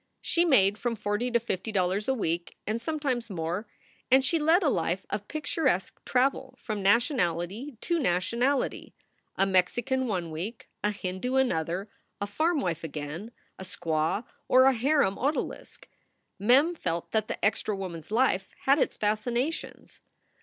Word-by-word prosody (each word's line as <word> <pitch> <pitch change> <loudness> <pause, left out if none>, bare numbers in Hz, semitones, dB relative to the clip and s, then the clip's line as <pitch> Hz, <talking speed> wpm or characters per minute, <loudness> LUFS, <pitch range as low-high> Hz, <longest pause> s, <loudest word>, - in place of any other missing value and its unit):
She 345 +1 +1
made 205 - +4
from 240 -1 -1
forty 210 +3 -1
to 240 -1 +2
fifty 220 -2 -3
dollars 190 +1 0
a 265 - +2
week, 170 -6 -2
and 220 +2 -2
sometimes 265 -5 -2
more, 180 +3 -3 0.4
and 265 +1 +5
she 330 +5 +1
led 325 +5 +4
a - - +3
life 180 - 0
of 205 0 -3
picturesque 305 - -1
travel 260 +1 +1
from 215 -3 -4
nationality 210 - +1
to 340 -1 0
nationality 235 - 0 0.4
a 195 - +3
Mexican 240 +8 +1
one 180 -6 -2
week, 190 +9 -6 0.2
a 210 - +3
Hindu 200 +5 -3
another, 185 -7 +1 0.3
a 205 - -1
farm 310 +9 +1
wife 170 -7 -2
again, 155 +6 -5 0.3
a - - -6
squaw, 175 +2 -1 0.2
or 255 0 +6
a 270 0 +6
harem 255 -4 +2
odalisque. 285 +4 -3 0.5
Mem 260 - +5
felt 170 - -3
that 215 -1 +1
the - - -2
extra 210 0 +1
woman 185 -4 -5
s 160 - -17
life 220 -4 +2 0.2
had 275 +3 +4
its - - 0
fascinations. 235 +8 -2
215 Hz, 155 wpm, -28 LUFS, 185-265 Hz, 0.5 s, or